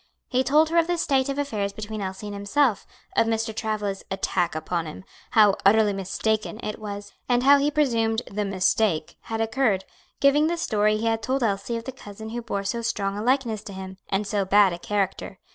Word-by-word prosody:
He 255 0 +2
told 305 +4 +4
her 340 - +2
of 330 - +2
the 350 0 0
state 275 -5 +1
of 275 - -2
affairs 215 -9 -2
between 215 0 -6
Elsie 190 +2 -5
and 205 - -5
himself, 205 +3 +1 0.3
of 225 - +3
Mr. 225 -1 -1
Travilla's 210 -3 -2
"attack 190 -3 -1
upon 165 +1 -2
him;" 155 - -9 0.3
how 210 -3 +6
"utterly 210 +1 +5
mistaken" 215 +3 -2
it 215 - -4
was, 205 -1 -7 0.2
and 245 0 +3
how 280 +1 +7
he 285 +1 +2
presumed 235 -6 +1
"the 210 +1 -3
mistake" 190 -3 +1
had 225 0 -3
occurred; 225 -4 +1 0.3
giving 290 +2 +4
the 340 +1 -1
story 215 -7 +1
he 220 - -3
had 225 0 +1
told 260 +3 -1
Elsie 205 +2 -1
of 230 - -6
the 265 - -5
cousin 220 -3 -10
who 240 +2 -4
bore 200 -4 -3
so 235 +4 -2
strong 200 -3 -1
a 205 - -3
likeness 240 -3 +1
to 200 - -7
him, 190 0 -8
and 195 +2 0
so 200 0 0
bad 195 -1 +5
a 170 - -6
character. 195 0 -2
215 Hz, 210 wpm, -25 LUFS, 200-245 Hz, 0.3 s, how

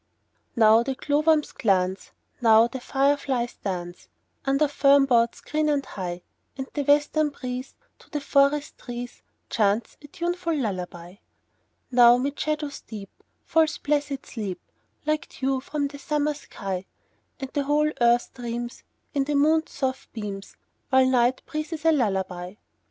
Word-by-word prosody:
Now 220 -1 +6
the 265 +2 -2
glowworms 300 +2 +2
glance, 190 -2 0 0.3
Now 225 -1 +7
the 260 +2 -6
fireflies 270 -2 0
dance, 175 -3 -5 0.4
Under 275 +2 +3
fern 280 -1 +5
boughs 235 -3 +2
green 305 0 0
and 285 -2 +1
high; 180 -2 -5 0.3
And 265 - -3
the 290 - -1
western 295 +2 +3
breeze 255 -2 -6 0.2
To - - -20
the 295 - -2
forest 280 +1 +2
trees 245 0 -7 0.3
Chants 210 +1 +1
a 290 - -12
tuneful 345 0 -2
lullaby. 180 -6 -4 0.7
Now 240 -1 +7
'mid 280 +3 -2
shadows 300 -2 -2
deep 205 -3 -9 0.3
Falls 320 0 +2
blessed 285 -2 -1
sleep, 200 -6 -5 0.5
Like 305 0 -1
dew 265 0 +1
from 285 +1 -2
the 285 0 -10
summer 300 +1 0
sky; 195 -9 -6 0.5
And 270 -1 -6
the 285 -2 0
whole 300 +1 +2
earth 240 0 +3
dreams, 240 0 -5 0.3
In 275 -1 +1
the 295 +1 -1
moon's 315 +3 +3
soft 265 -1 -3
beams, 200 -3 -6 0.3
While 260 0 +5
night 255 0 +2
breathes 310 +1 -5
a 325 - +6
lullaby. 190 - -1
265 Hz, 140 wpm, -25 LUFS, 225-295 Hz, 0.7 s, Now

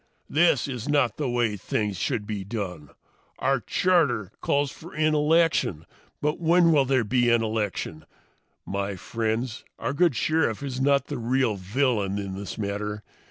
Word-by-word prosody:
"This 155 -4 +3
is 125 -1 -5
not 140 -7 +2
the 145 -4 -1
way 120 -3 +1
things 105 +1 -2
should 110 -1 -1
be 105 -2 -4
done. 95 -8 -5 0.5
Our 135 0 +1
charter 140 - +1
calls 140 -1 +1
for 170 +3 -12
an 155 0 +2
election 150 - +2 0.4
but 150 +1 0
when 170 0 +4
will 145 -4 +4
there 130 -2 +2
be 120 +2 +2
an 120 -1 +3
election? 105 -8 -3 0.6
My 100 0 -2
friends, 110 +4 -3
our 115 +4 -2
good 170 -2 +3
Sheriff 145 -3 +1
is 130 -2 -3
not 140 0 +3
the 145 -4 -5
real 120 -1 +1
villain 100 0 0
in 100 -1 -4
this 100 +1 -6
matter. 105 0 -3
120 Hz, 160 wpm, -26 LUFS, 105-145 Hz, 0.6 s, when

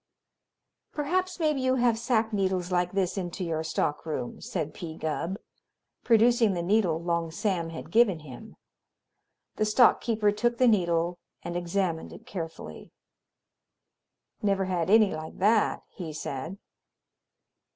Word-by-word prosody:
"Perhaps 365 +5 -1
maybe 305 -4 +1
you 260 0 +2
have 240 -2 +3
sack 225 -2 +1
needles 190 -2 0
like 180 0 +1
this 195 0 0
into 180 0 -4
your 160 -2 -2
stock 150 -2 -1
room," 145 -6 -5
said 155 -4 -4
P. 160 -2 -7
Gubb, 165 +4 -2 0.7
producing 230 -2 +4
the 175 -1 -2
needle 180 -4 +2
Long 170 -1 0
Sam 170 -1 -1
had 165 - -8
given 215 -8 +4
him. 130 -5 -11 1.0
The 215 - +2
stock 220 +3 +5
keeper 215 -3 +1
took 240 +3 0
the 255 - +4
needle 175 -4 +2 0.2
and 175 - -5
examined 175 -1 -1
it 230 - -12
carefully. 165 -9 -7 1.5
"Never 195 -2 +1
had 180 -2 -1
any 215 -1 +5
like 155 0 -7
that," 210 +3 +2
he 165 -4 -7
said. 155 +4 -5
190 Hz, 135 wpm, -27 LUFS, 165-225 Hz, 1.5 s, stock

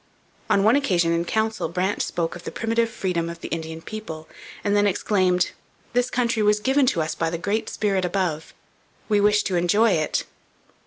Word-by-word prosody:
On 195 - +3
one 220 +5 +5
occasion 180 -12 +2
in 170 0 0
council 220 +3 -1
Brant 185 +3 -1
spoke 165 0 -2
of 175 - -10
the - - -4
primitive 230 0 0
freedom 180 -7 -2
of 170 0 -8
the - - -6
Indian 160 0 -5
people, 160 -8 -7 0.4
and 205 0 +1
then 205 0 +4
exclaimed: 185 -2 +1 0.4
'This 245 +1 +2
country 235 -2 0
was 210 0 +3
given 265 +5 +2
to 165 -10 +2
us 155 - -3
by 165 - -1
the 170 - -3
Great 205 +6 -1
Spirit 195 -3 0
above; 175 -4 -1 0.6
we 210 -1 +3
wish 210 0 +4
to 185 - -1
enjoy 205 +6 +3
it.' 155 -4 0
195 Hz, 190 wpm, -24 LUFS, 170-220 Hz, 0.6 s, one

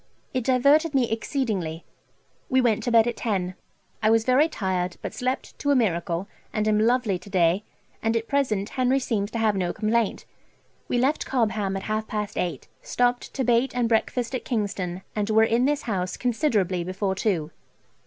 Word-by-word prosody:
It 255 -2 0
diverted 280 +4 +4
me 250 -4 +2
exceedingly. 215 - -2 0.6
We 260 -2 +3
went 235 -4 +2
to 240 - 0
bed 225 -1 +6
at 240 - -2
ten. 190 -6 -1 0.5
I 215 - +3
was 225 0 +3
very 260 +5 +4
tired, 185 - -2
but - - -4
slept 255 +1 -3
to 285 - -1
a 285 - +5
miracle, 175 -5 0 0.2
and 215 -1 -1
am 210 -1 +3
lovely 225 -4 +2
to 200 - -13
day, 180 +1 +2 0.4
and 225 +1 +1
at 225 0 -4
present 220 -8 0
Henry 255 0 +1
seems 220 -6 -1
to 230 - -4
have 220 -2 +2
no 180 -2 0
complaint. 220 0 0 0.6
We - - 0
left 270 +5 +1
Cobham 215 -6 0
at 195 - -6
half 215 0 -2
past 210 -1 -3
eight, 175 - -3
stopped 245 0 0
to 265 - 0
bait 245 +2 +2
and 245 -2 +2
breakfast 235 +2 0
at 255 - -2
Kingston, 195 -6 -2
and 210 0 -1
were 220 0 +5
in 230 +3 +2
this 290 +1 0
house 185 -5 -2
considerably 215 - 0
before 190 +2 -2
two. 180 -6 -1
220 Hz, 185 wpm, -25 LUFS, 195-250 Hz, 0.6 s, bed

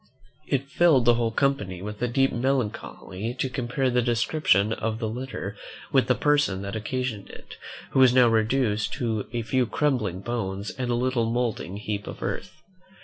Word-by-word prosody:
It 140 0 0
filled 155 -4 +4
the 120 - +6
whole 115 -1 +1
company 115 -7 0
with 105 +1 -6
a 125 - +2
deep 135 +3 +2
melancholy 120 -4 -2
to 130 - -1
compare 130 +1 -1
the 125 0 +3
description 115 -3 +2
of 110 0 -2
the 115 -1 -2
letter 115 -3 -5 0.4
with 135 -2 +3
the 125 - +3
person 145 -11 +2
that 100 +1 -5
occasioned 110 -1 -3
it, - - -12 0.3
who - - +2
was 130 -2 +7
now 125 -1 +6
reduced 110 -1 +1
to 110 -4 -2
a 120 -1 -2
few 125 +2 +1
crumbling 110 - 0
bones 100 -3 -3
and 125 -1 -4
a 120 - +2
little 120 -2 0
mouldering 115 -6 -2
heap 105 -1 -4
of - - -7
earth. 155 - -5
120 Hz, 175 wpm, -26 LUFS, 105-130 Hz, 0.4 s, was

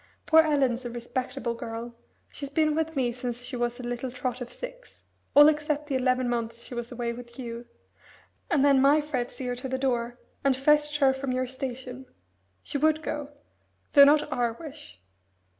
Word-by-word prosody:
Poor 320 - +6
Ellen's 270 -6 +1
a 240 - -4
respectable 245 +1 -3
girl 230 0 -6 0.4
she's 280 - -6
been 305 +1 +2
with 320 +1 -1
me 250 -3 +1
since 245 0 -5
she 260 - -6
was 240 0 -2
a - - -7
little 245 +1 -3
trot 250 0 -4
of 245 - -6
six - - -10 0.3
all 295 +1 +10
except 300 -1 +1
the 285 -2 -2
eleven 255 -1 +1
months 235 -1 -3
she - - -10
was 240 0 -5
away 240 -1 -3
with 235 0 -11
you 235 -2 -6 0.8
and 285 -1 +3
then 275 -2 +5
my 285 +3 +5
Fred 270 -5 -2
see 260 - -8
her 245 0 -2
to 255 +2 -6
the 260 - -1
door, 245 -2 -1 0.3
and 275 -2 +3
fetched 295 +2 +3
her 270 -2 +4
from 265 0 -3
your 255 0 0
station. 260 0 -6 0.6
She 285 - -3
would 310 +1 +2
go 295 -2 -4 0.6
though 280 -2 +10
not 295 +1 +4
our 240 -3 0
wish. 235 - -11
260 Hz, 190 wpm, -27 LUFS, 240-290 Hz, 0.8 s, all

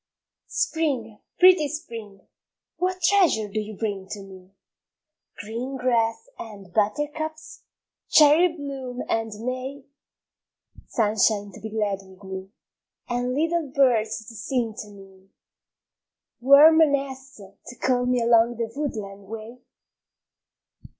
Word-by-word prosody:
SPRING, 260 -10 -1 0.2
pretty 365 -4 +6
Spring, 230 - -8 0.6
what 370 0 -2
treasure 335 - +3
do 210 +2 -3
you 215 -1 -6
bring 200 -4 -3
to 205 -2 -6
me? 190 -1 -14 0.9
Green 235 +6 -5
grass 235 - 0
and 200 -5 -10
buttercups, 295 +9 -2 0.5
cherry 310 +4 +6
bloom 275 -6 -6
and 225 0 -1
may? 260 +2 -4 1.0
Sunshine 210 -2 +1
to - - -12
be 220 - -6
glad 210 -3 -1
with 190 0 -17
me, 190 0 -7 0.6
and 245 +1 -1
little 325 +1 0
birds 225 -5 +2
to 230 - -11
sing 230 +1 -2
to 210 - -10
me? 195 -1 -16 1.1
Warm 290 +5 +7
nests 275 -3 0 0.3
to 245 - -9
call 250 0 0
me 250 -1 +1
along 235 0 +4
the 230 -1 -3
woodland 205 -9 -5
way? 225 +3 -8
235 Hz, 115 wpm, -24 LUFS, 210-280 Hz, 1.1 s, Warm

